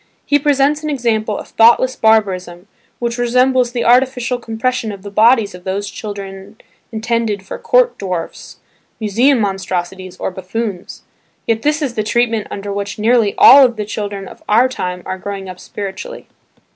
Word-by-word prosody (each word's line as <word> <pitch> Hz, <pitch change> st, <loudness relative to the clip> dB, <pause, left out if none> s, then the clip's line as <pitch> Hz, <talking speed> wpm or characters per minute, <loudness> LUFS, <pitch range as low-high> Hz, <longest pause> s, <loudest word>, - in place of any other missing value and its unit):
He 290 Hz, -, +3 dB
presents 290 Hz, +1 st, +2 dB
an 305 Hz, -, -4 dB
example 225 Hz, -6 st, -1 dB
of -, -, -9 dB
thoughtless 240 Hz, +3 st, +4 dB
barbarism, 190 Hz, -5 st, +1 dB, 0.3 s
which 235 Hz, 0 st, -3 dB
resembles 250 Hz, +1 st, +2 dB
the 240 Hz, -1 st, -2 dB
artificial 250 Hz, 0 st, +2 dB
compression 230 Hz, 0 st, -2 dB
of 195 Hz, -2 st, -10 dB
the 200 Hz, -, -8 dB
bodies 220 Hz, 0 st, +3 dB
of 180 Hz, 0 st, -12 dB
those 195 Hz, +2 st, -3 dB
children 200 Hz, -1 st, -8 dB, 0.3 s
intended 220 Hz, -3 st, -2 dB
for -, -, -7 dB
"court -, -, +2 dB
dwarfs," 180 Hz, -4 st, -5 dB, 0.4 s
museum 235 Hz, +5 st, +2 dB
monstrosities 185 Hz, -2 st, -3 dB
or -, -, -3 dB
buffoons. 190 Hz, +1 st, -5 dB, 0.4 s
Yet 225 Hz, -1 st, 0 dB
this 300 Hz, +3 st, 0 dB
is 265 Hz, -4 st, -2 dB
the 220 Hz, -, -1 dB
treatment 225 Hz, 0 st, 0 dB
under 200 Hz, 0 st, -5 dB
which 200 Hz, 0 st, -4 dB
nearly 225 Hz, -1 st, +2 dB
all 270 Hz, -1 st, +8 dB
the 215 Hz, -3 st, -5 dB
children 205 Hz, -2 st, -5 dB
of -, -, -13 dB
our 230 Hz, +5 st, +5 dB
time 180 Hz, -8 st, -5 dB
are 185 Hz, -, -5 dB
growing 195 Hz, 0 st, -6 dB
up 185 Hz, -1 st, -9 dB
spiritually. 200 Hz, +1 st, -7 dB
220 Hz, 160 wpm, -16 LUFS, 195-245 Hz, 0.4 s, all